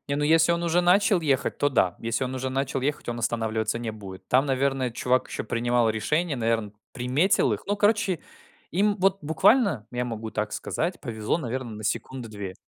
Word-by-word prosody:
Не, 140 - +1
ну, 145 - 0
если 165 +2 +4
он 170 0 -1
уже 170 +1 +2
начал 185 +1 +4
ехать, 140 -3 0
то 145 - +3
да. 95 -9 +1
Если 115 +3 -1
он 130 +1 -4
уже 130 0 -2
начал 135 0 -1
ехать, 145 0 -2
он 120 0 -3
останавливаться 110 -1 -1
не 115 -2 -3
будет. 95 -3 -10
Там, 130 +3 +3
наверное, 135 -1 0
чувак 125 +2 0
ещё - - -4
принимал 120 0 +1
решение, 150 +8 0
наверно, 115 -3 -1 0.2
приметил 135 +10 +2
их. - - -3
Ну, 205 +1 0
короче, 205 -3 +2 0.5
им 205 +3 +2
вот 195 +1 +2
буквально, 160 - +3
я 125 0 -1
могу 115 -2 -5
так 105 -1 -3
сказать, 170 +3 -3
повезло, 110 +2 -2
наверно, 130 -4 -4
на 110 0 -8
секунды 130 +2 -3
2. 100 -3 -7
130 Hz, 195 wpm, -26 LUFS, 115-165 Hz, 0.5 s, если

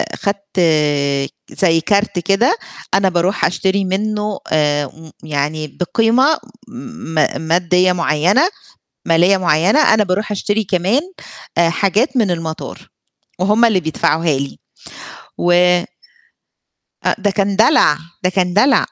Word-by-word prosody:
خدت 200 -1 -4 0.9
زي 165 -3 +2
كارت 200 0 0
كده 195 - +2 0.4
أنا 195 0 +3
باروح 180 +3 0
أشتري 190 +2 0
منه 210 +2 -2
آآ 150 +1 -1
يعني 155 0 -3
بقيمة 235 - +2 0.3
م 235 -7 -9 0.3
مادية 180 +3 +2
معينة 180 - +2 0.6
مالية 175 +4 +4
معينة، 180 - +2
أنا 215 -1 +2
باروح 200 +3 -2
أشتري 205 +2 -1
كمان 190 +7 +1 0.6
آآ 170 -1 +4
حاجات 210 - 0
من 220 -6 +2
المطار 165 -2 -6 0.5
وهم 210 +5 +3
اللي 215 -5 +3
بيدفعوها 160 -2 0
لي 140 0 -6 0.8
و 175 0 +1 1.5
أ - - +2
ده 205 -1 0
كان 200 0 -1
دلع 210 - +4 0.3
ده 180 - +2
كان 180 -1 -1
دلع 255 +7 +3
190 Hz, 115 wpm, -17 LUFS, 165-210 Hz, 1.5 s, مالية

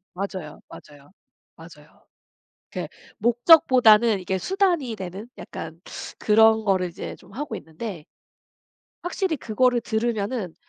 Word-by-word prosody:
맞아요, 185 -5 -6
맞아요. 145 +1 -15 0.4
맞아요. 160 -2 -16 0.7
그 - - -4 0.3
목적보다는 235 - +5
이게 190 +1 -2
수단이 350 - 0
되는 190 +4 -7
약간 160 +1 -8 0.4
그런 220 +1 +4
거를 185 -3 +1
이제 170 - -8
좀 195 +1 -19
하고 290 +6 -5
있는데 160 +2 -8 1.0
확실히 355 -2 -1
그거를 245 +1 +1
들으면은 220 -4 -2
215 Hz, 260 characters per minute, -24 LUFS, 180-240 Hz, 1.0 s, 목적보다는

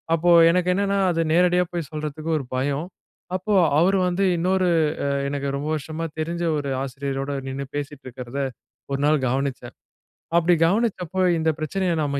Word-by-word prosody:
அப்போ, 175 +2 +2 0.2
எனக்கு 180 0 +1
என்னன்னா 200 +1 0
அது 165 0 0
நேரடியா 180 +1 +4
போய் 170 -5 -3
சொல்றதுக்கு 155 +1 -5
ஒரு 135 - -7
பயம். 140 +5 -1 0.5
அப்போ 205 +3 -1 0.3
அவரு 190 +3 +3
வந்து, 185 +2 +1
இன்னொரு, 185 +1 +1 0.4
அ - - 0 0.2
எனக்கு 140 0 -3
ரொம்ப 145 +2 -3
வருஷமா 155 +2 -4 0.2
தெரிஞ்ச 170 +2 -3 0.2
ஒரு 140 -1 -3
ஆசிரியரோட 135 +1 -4 0.2
நின்னு 135 +1 -4
பேசிட்டிருக்கிறத, 130 -3 -6 0.5
ஒரு 140 - -1
நாள் 150 -3 +2
கவனிச்சேன். 130 -2 -3 0.6
அப்பிடி 170 +1 +4
கவனிச்சப்போ, 190 -3 0 0.2
இந்த 160 0 +1
பிரச்சனைய 180 +3 -1
நம்ம, 140 -1 -1
155 Hz, 150 wpm, -23 LUFS, 140-180 Hz, 0.6 s, நேரடியா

